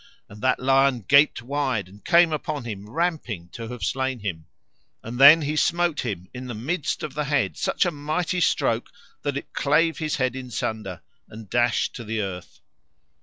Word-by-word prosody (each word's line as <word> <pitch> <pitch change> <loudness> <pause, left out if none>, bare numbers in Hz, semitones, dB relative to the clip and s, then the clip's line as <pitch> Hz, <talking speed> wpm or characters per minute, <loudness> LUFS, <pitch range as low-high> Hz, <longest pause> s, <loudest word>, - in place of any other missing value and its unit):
And 105 +1 -13
that 130 - +2
lion 135 -1 +3
gaped 140 -3 +5
wide 130 -7 -1
and 100 +2 -17
came 170 -2 +5
upon 150 -2 -3
him 105 -3 -7
ramping 140 - -2
to 115 +5 -8
have 125 0 -7
slain 130 -1 -1
him. 80 -6 -5 0.6
And 115 +2 -6
he 150 +2 +9
then 155 - -3
smote 170 -1 +1
him 95 -7 -4
in 125 0 -7
the 120 - -5
midst 145 +8 -2
of 150 - -5
the 150 +1 -2
head 145 0 0
such - - 0
a 175 - +1
mighty 165 +5 -2
stroke 115 -7 +1 0.3
that 140 -1 -2
it - - -8
clave 160 +3 +2
his 155 0 -1
head 130 -4 0
in 130 -1 -7
sunder, 110 -5 -4 0.3
and 110 -2 -11
dashed 120 -1 +1
to 120 - -7
the 110 0 -3
earth. 90 -3 -6
130 Hz, 185 wpm, -24 LUFS, 110-150 Hz, 0.6 s, he